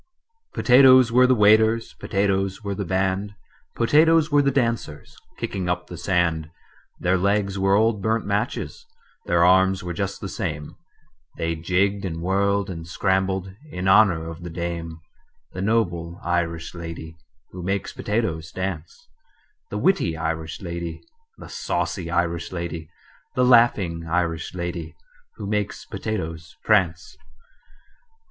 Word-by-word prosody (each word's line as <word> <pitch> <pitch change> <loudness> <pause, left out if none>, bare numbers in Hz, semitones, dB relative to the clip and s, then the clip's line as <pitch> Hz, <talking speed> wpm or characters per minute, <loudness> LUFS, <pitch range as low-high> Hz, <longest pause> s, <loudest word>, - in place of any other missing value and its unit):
"Potatoes 130 -1 +6
were 125 +2 +5
the 130 - +4
waiters, 110 +1 +4
Potatoes 95 0 -1
were 100 -1 -2
the 100 +1 -3
band, 95 +3 -1 0.4
Potatoes 155 +5 +4
were 145 0 +5
the 140 - +2
dancers 115 - -2 0.2
Kicking 95 -2 -3
up 90 0 -1
the 90 - -9
sand: 85 -3 0 0.5
Their 90 +1 +1
legs 100 0 0
were 95 +1 +3
old 110 0 +2
burnt 110 +2 0
matches, 110 - -3 0.4
Their 85 0 +4
arms 95 +1 +4
were 90 -1 -4
just - - -3
the - - -5
same, 75 0 -5 0.6
They 85 0 -1
jigged 95 +5 0
and 85 -4 -4
whirled 100 +3 +1
and 85 -4 -7
scrambled 95 +1 0 0.2
In 90 -4 -4
honor 95 -5 +4
of 85 +1 -8
the 85 - -6
dame: 85 -1 -5 0.5
The 90 - -5
noble 85 -5 0
Irish 85 -1 -2
lady 85 -1 -8 0.4
Who 90 - -8
makes 95 +3 -2
potatoes 90 -7 -2
dance, 95 - -5 0.6
The - - -4
witty 135 - +1
Irish 80 -1 -3
lady, 85 -2 -5 0.3
The - - -11
saucy 90 -5 -3
Irish 85 -1 -1
lady, 85 -3 -5 0.5
The 125 - +3
laughing 100 -9 +3
Irish 85 0 -1
lady 85 -3 -5 0.4
Who 105 - -7
makes 105 0 -2
potatoes 80 -6 -5
prance. 90 -5 +1
95 Hz, 135 wpm, -23 LUFS, 85-105 Hz, 0.6 s, Potatoes